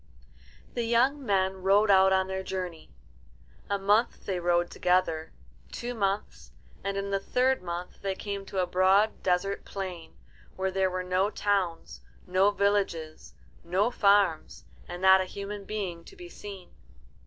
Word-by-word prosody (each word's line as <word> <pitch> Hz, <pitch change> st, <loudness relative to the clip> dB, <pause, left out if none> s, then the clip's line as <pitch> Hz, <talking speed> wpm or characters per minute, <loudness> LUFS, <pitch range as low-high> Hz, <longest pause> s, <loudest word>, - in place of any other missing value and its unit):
The 240 Hz, -1 st, -2 dB
young 255 Hz, +5 st, +2 dB
men 190 Hz, -4 st, +1 dB
rode 200 Hz, +3 st, +3 dB
out 190 Hz, 0 st, +6 dB
on 190 Hz, 0 st, +3 dB
their 190 Hz, 0 st, -4 dB
journey. 180 Hz, -3 st, -5 dB, 0.8 s
A 200 Hz, -, +1 dB
month 205 Hz, +4 st, +1 dB
they 190 Hz, -3 st, -2 dB
rode 175 Hz, 0 st, +1 dB
together, 180 Hz, -3 st, 0 dB, 0.4 s
two 240 Hz, +1 st, -5 dB
months, 200 Hz, -2 st, -3 dB, 0.3 s
and 200 Hz, 0 st, -2 dB
in 200 Hz, 0 st, -3 dB
the 195 Hz, -, +1 dB
third 255 Hz, +6 st, +1 dB
month 175 Hz, 0 st, -6 dB
they 195 Hz, -1 st, -2 dB
came 200 Hz, 0 st, -5 dB
to 195 Hz, -, -7 dB
a 185 Hz, -, +2 dB
broad 190 Hz, +4 st, +3 dB
desert 190 Hz, +2 st, 0 dB
plain, 185 Hz, -4 st, -7 dB, 0.4 s
where 190 Hz, 0 st, -1 dB
there 190 Hz, 0 st, +1 dB
were 185 Hz, 0 st, -3 dB
no 185 Hz, +2 st, +1 dB
towns, 180 Hz, -, -2 dB, 0.2 s
no 185 Hz, +2 st, +3 dB
villages, 200 Hz, -6 st, -1 dB, 0.3 s
no 185 Hz, +7 st, +1 dB
farms, 200 Hz, -7 st, +2 dB, 0.2 s
and 175 Hz, +1 st, -7 dB
not 190 Hz, 0 st, +7 dB
a -, -, -2 dB
human 200 Hz, +1 st, -7 dB
being 190 Hz, -5 st, -4 dB
to -, -, -14 dB
be 355 Hz, -2 st, -11 dB
seen. 200 Hz, -, -10 dB
190 Hz, 155 wpm, -28 LUFS, 180-205 Hz, 0.8 s, not